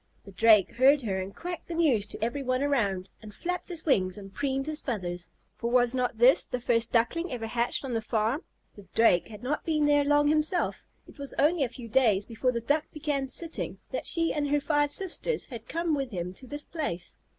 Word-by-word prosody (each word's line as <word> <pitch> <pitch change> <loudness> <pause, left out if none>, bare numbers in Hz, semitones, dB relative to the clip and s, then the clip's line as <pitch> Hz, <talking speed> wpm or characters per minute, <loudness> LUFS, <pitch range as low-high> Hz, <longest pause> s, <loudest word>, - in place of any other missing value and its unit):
The 200 - -11
Drake 210 0 +5
heard 275 +2 +5
her 195 -4 -1
and 190 +1 -6
quacked 350 -1 -6
the 340 - -5
news 265 -12 +2
to - - -7
every 240 +5 -1
one 255 0 0
around, 200 -10 0
and 215 -1 -10
flapped 360 - -4
his 340 -3 -5
wings, 185 - +2
and 195 -1 -10
preened 270 +1 -1
his 310 0 -2
feathers, 180 -8 -4 0.3
for 235 - -3
was 245 0 +3
not 250 -3 -1
this 245 +4 +5
the 250 - -4
first 230 -1 +1
Duckling 325 +9 +1
ever 235 -3 -4
hatched 235 +4 -1
on 255 - -4
the 225 - 0
farm? 220 +6 0 0.3
The 205 -2 -14
Drake 220 -6 +4
had 215 +1 -11
not 290 +4 -2
been 305 -2 +1
there 290 0 +4
long 290 0 +3
himself. 310 +4 0 0.2
It - - -16
was 280 -1 -4
only 305 +1 +3
a 255 - -1
few 240 0 -9
days 220 -4 +3
before 245 +2 -1
the 235 -1 -3
Duck 290 +6 +1
began 290 -3 -2
sitting 330 +5 0
that - - -3
she 330 -1 +3
and 290 -1 -1
her 290 +1 +2
five 290 0 +1
sisters 385 +7 0
had 230 -4 -9
come 335 -1 -1
with 275 -3 -1
him 180 -4 -4
to 255 +7 -13
this 290 +3 -3
place. 185 - -5
255 Hz, 220 wpm, -28 LUFS, 225-295 Hz, 0.3 s, Drake